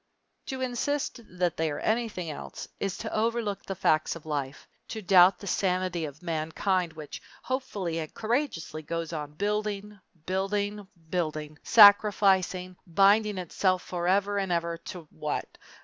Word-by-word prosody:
To 265 Hz, -1 st, -4 dB
insist 260 Hz, +2 st, -1 dB, 0.2 s
that 180 Hz, -2 st, 0 dB
they 160 Hz, 0 st, +1 dB
are 145 Hz, -, -3 dB
anything 215 Hz, -7 st, -1 dB
else -, -, -8 dB
is 195 Hz, -2 st, -2 dB
to 220 Hz, -, -5 dB
overlook 220 Hz, -2 st, 0 dB
the 195 Hz, -, -5 dB
facts 155 Hz, -2 st, +2 dB
of 165 Hz, -, -11 dB
life, 145 Hz, -3 st, -4 dB, 0.2 s
to 220 Hz, -, -5 dB
doubt 185 Hz, 0 st, +6 dB
the -, -, -10 dB
sanity 185 Hz, -3 st, 0 dB
of 145 Hz, +2 st, -10 dB
mankind 170 Hz, +2 st, -1 dB
which 155 Hz, -2 st, -8 dB, 0.2 s
hopefully 205 Hz, -10 st, -2 dB
and 155 Hz, -1 st, -5 dB
courageously 220 Hz, -, -2 dB
goes 165 Hz, +1 st, -4 dB
on 150 Hz, -2 st, -5 dB
building, 210 Hz, +2 st, -2 dB, 0.3 s
building, 200 Hz, +2 st, -1 dB, 0.2 s
building, 155 Hz, -4 st, -2 dB
sacrificing, 195 Hz, -4 st, +5 dB
binding 200 Hz, +4 st, +4 dB
itself 185 Hz, +1 st, 0 dB
forever 195 Hz, +3 st, +1 dB
and 195 Hz, -2 st, -2 dB
ever 170 Hz, 0 st, 0 dB
to 175 Hz, -4 st, -8 dB
what? -, -, -4 dB
185 Hz, 140 wpm, -28 LUFS, 165-205 Hz, 0.3 s, doubt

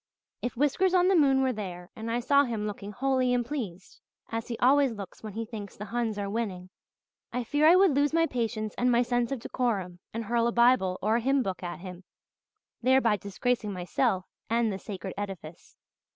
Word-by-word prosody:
"If 245 Hz, -1 st, -4 dB
Whiskers 355 Hz, +7 st, +2 dB
on 365 Hz, 0 st, +4 dB
the 385 Hz, -, +4 dB
moon 270 Hz, -4 st, +4 dB
were 260 Hz, -1 st, +1 dB
there 180 Hz, -4 st, -7 dB
and 225 Hz, +1 st, -5 dB
I 235 Hz, +1 st, 0 dB
saw 280 Hz, +3 st, +4 dB
him 225 Hz, -5 st, -3 dB
looking 205 Hz, -1 st, -5 dB
holy 255 Hz, +2 st, +1 dB
and 240 Hz, -1 st, 0 dB
pleased, 210 Hz, -10 st, -6 dB, 0.3 s
as 225 Hz, 0 st, -3 dB
he 235 Hz, -, -4 dB
always 270 Hz, 0 st, +4 dB
looks 200 Hz, -4 st, -9 dB
when 215 Hz, -2 st, -7 dB
he 225 Hz, +2 st, -3 dB
thinks 210 Hz, -3 st, -8 dB
the 210 Hz, -, -6 dB
Huns 225 Hz, 0 st, -2 dB
are 200 Hz, -1 st, -2 dB
winning, 195 Hz, -4 st, -4 dB, 0.6 s
I 250 Hz, -, -2 dB
fear 290 Hz, +6 st, +3 dB
I 340 Hz, -, +8 dB
would 380 Hz, -2 st, +5 dB
lose 285 Hz, +1 st, +2 dB
my 330 Hz, +1 st, +3 dB
patience 225 Hz, -6 st, -2 dB
and 250 Hz, 0 st, +3 dB
my 240 Hz, +1 st, +4 dB
sense 245 Hz, 0 st, 0 dB
of 275 Hz, -, -1 dB
decorum 205 Hz, -7 st, -2 dB
and 230 Hz, +1 st, -4 dB
hurl 235 Hz, +1 st, +1 dB
a -, -, +1 dB
Bible 235 Hz, -6 st, +3 dB
or 220 Hz, +3 st, +3 dB
hymn 270 Hz, +2 st, +2 dB
book 190 Hz, -4 st, -4 dB
at 175 Hz, -1 st, -6 dB
him, 180 Hz, -1 st, -9 dB, 0.8 s
thereby 255 Hz, -3 st, +4 dB
disgracing 210 Hz, +2 st, -2 dB
myself 185 Hz, +2 st, 0 dB, 0.2 s
and 230 Hz, -2 st, +1 dB
the 190 Hz, -, -5 dB
sacred 190 Hz, -3 st, -6 dB
edifice. 190 Hz, -5 st, -8 dB
230 Hz, 200 wpm, -28 LUFS, 200-255 Hz, 0.8 s, I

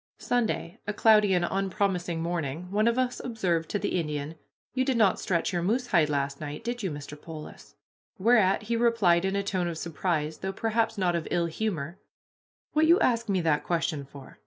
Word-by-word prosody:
Sunday, 225 Hz, -8 st, -1 dB
a 210 Hz, -, -1 dB
cloudy 210 Hz, -1 st, +5 dB
and 175 Hz, -1 st, +2 dB
unpromising 190 Hz, -3 st, -1 dB
morning. 170 Hz, 0 st, -3 dB
One 215 Hz, +2 st, +2 dB
of 235 Hz, +1 st, +2 dB
us 255 Hz, -1 st, 0 dB
observed 180 Hz, -9 st, -1 dB
to -, -, 0 dB
the 185 Hz, -, -1 dB
Indian, 150 Hz, -1 st, -3 dB, 0.4 s
"You 260 Hz, +1 st, +1 dB
did 260 Hz, -2 st, 0 dB
not 205 Hz, -5 st, +3 dB
stretch 180 Hz, 0 st, -1 dB
your 175 Hz, -, 0 dB
moose 230 Hz, +8 st, 0 dB
hide 170 Hz, -9 st, +3 dB
last 140 Hz, -1 st, -2 dB
night, 145 Hz, -1 st, -6 dB
did 240 Hz, 0 st, -3 dB
you, 190 Hz, -, -1 dB
Mr. 145 Hz, -1 st, -7 dB
Polis?" 155 Hz, -2 st, -10 dB, 0.4 s
Whereat 210 Hz, -2 st, +3 dB
he 230 Hz, +2 st, -1 dB
replied 220 Hz, -7 st, +3 dB
in 190 Hz, +1 st, 0 dB
a 200 Hz, -, 0 dB
tone 185 Hz, -3 st, -1 dB
of 170 Hz, -2 st, -4 dB
surprise, 160 Hz, -2 st, -2 dB
though 190 Hz, 0 st, -3 dB
perhaps 225 Hz, +1 st, 0 dB
not 180 Hz, -3 st, +1 dB
of 170 Hz, -, -2 dB
ill 170 Hz, -1 st, +1 dB
humor: 170 Hz, -2 st, -3 dB, 0.7 s
"What 310 Hz, +1 st, +4 dB
you 340 Hz, +3 st, +6 dB
ask 235 Hz, -2 st, +1 dB
me 190 Hz, -2 st, +2 dB
that 160 Hz, -3 st, +1 dB
question 165 Hz, -4 st, -1 dB
for? 140 Hz, -1 st, -13 dB
185 Hz, 195 wpm, -27 LUFS, 165-220 Hz, 0.7 s, you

